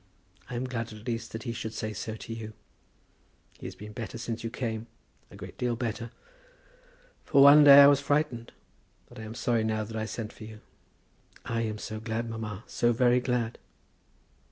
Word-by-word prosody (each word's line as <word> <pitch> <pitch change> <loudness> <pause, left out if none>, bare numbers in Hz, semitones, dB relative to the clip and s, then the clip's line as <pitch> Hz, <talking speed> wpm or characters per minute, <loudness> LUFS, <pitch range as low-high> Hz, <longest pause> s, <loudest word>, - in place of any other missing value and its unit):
I 125 - -5
am 120 - -2
glad 115 -3 -4
at 105 0 -11
least 115 -1 -3
that 110 - -6
he 120 -3 -3
should 110 -1 -5
say 110 0 -3
so 110 +1 -5
to 110 +1 -7
you. 110 -1 -7 1.1
He - - -6
has - - -8
been 105 +1 -10
better 115 0 -6
since 115 -1 -5
you 115 - -2
came; 115 -2 -4 0.4
a - - -14
great - - -10
deal 120 -1 0
better. 115 0 -4 1.1
For 140 - +5
one 145 +2 +9
day 140 0 +10
I - - +10
was 140 -1 +5
frightened; 140 -5 -1 0.6
but - - -13
I - - -7
am 110 +1 -8
sorry 115 -2 +1
now 110 -1 -1
that 110 +1 -8
I 110 0 -2
sent 110 0 -6
for - - -12
you." 110 0 -11 0.8
"I 115 0 -1
am 110 -2 -2
so 110 0 -6
glad, 110 +1 -3
mamma; 110 -2 -6
so 120 - +1
very 120 +1 +3
glad." 125 -2 -2
115 Hz, 195 wpm, -28 LUFS, 110-125 Hz, 1.1 s, day